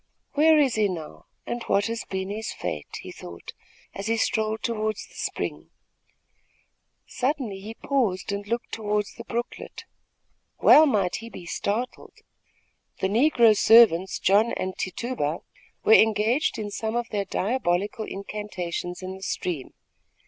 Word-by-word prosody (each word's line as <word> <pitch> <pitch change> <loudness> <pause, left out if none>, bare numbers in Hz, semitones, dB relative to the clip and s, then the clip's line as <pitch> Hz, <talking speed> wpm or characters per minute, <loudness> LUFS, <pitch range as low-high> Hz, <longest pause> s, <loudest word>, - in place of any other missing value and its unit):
"Where 310 +2 +5
is 275 -5 +3
he 215 -1 +2
now, 165 -5 -7 0.2
and 240 0 -4
what 200 +1 +2
has 230 0 -3
been 190 0 -4
his 220 +1 -4
fate?" 75 - -5
he - - -9
thought, 85 -1 -10 0.4
as 200 +2 -5
he 230 0 +1
strolled 220 0 0
toward 215 -2 -1
the - - -11
spring. - - -4 1.4
Suddenly 255 -6 -2
he 215 +3 -8
paused 220 -11 -1
and 200 0 -4
looked 235 +2 -3
toward 210 -1 -1
the 235 - -8
brooklet. 235 +1 -5 0.8
Well 310 +1 +8
might 200 -9 +1
he 230 +1 -9
be 180 - -10
startled. 210 +7 -3 0.8
The 190 - 0
negro 235 -1 +5
servants, 200 -5 +6
John 210 +5 +3
and 185 0 -3
Tituba, 185 - -3 0.4
were 220 - +6
engaged 220 +6 +4
in 210 -1 -4
some 220 +2 -3
of 240 -1 -1
their 200 -2 -1
diabolical 205 -1 -1
incantations 190 -3 -5
in 185 0 -5
the 190 - -12
stream. 175 -7 -3
215 Hz, 140 wpm, -25 LUFS, 190-235 Hz, 1.4 s, Well